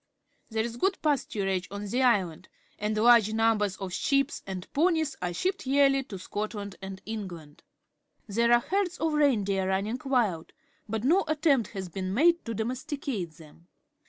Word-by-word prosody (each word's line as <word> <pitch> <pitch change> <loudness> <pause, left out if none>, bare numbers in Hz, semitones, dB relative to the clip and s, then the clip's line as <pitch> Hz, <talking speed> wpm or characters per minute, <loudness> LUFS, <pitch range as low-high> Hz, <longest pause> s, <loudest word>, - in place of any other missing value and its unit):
There 220 -1 0
is 235 0 -5
good 385 +7 +1
pasturage 195 - 0
on 200 +2 -6
the 245 +6 -1
island, 190 -9 +1 0.3
and 210 +1 -1
large 225 -1 +5
numbers 220 -3 +2
of 190 -2 -5
jhe.ep 275 - +1 0.2
and 185 -2 -5
gonies 320 -1 +2
are 180 -1 -1
shipped 375 - -2
yearly 275 0 +4
to 200 -7 -7
Scotland 205 +1 -5
and 190 0 -7
England. 180 -9 -7 0.6
There 235 +3 +1
are 240 0 +6
herds 370 +3 -1
of 320 -1 0
reindeer 205 -10 +2
run 190 +1 +1
ning 225 +5 -4
Mild, 230 -12 0 0.4
but 220 0 -2
no 345 +9 +4
attempt 295 - +2
has 190 -2 -4
been 185 +2 -4
made 335 +6 +4
to 230 -1 -4
domesticate 250 - -3
them. 160 +1 -17
220 Hz, 160 wpm, -28 LUFS, 195-275 Hz, 0.6 s, are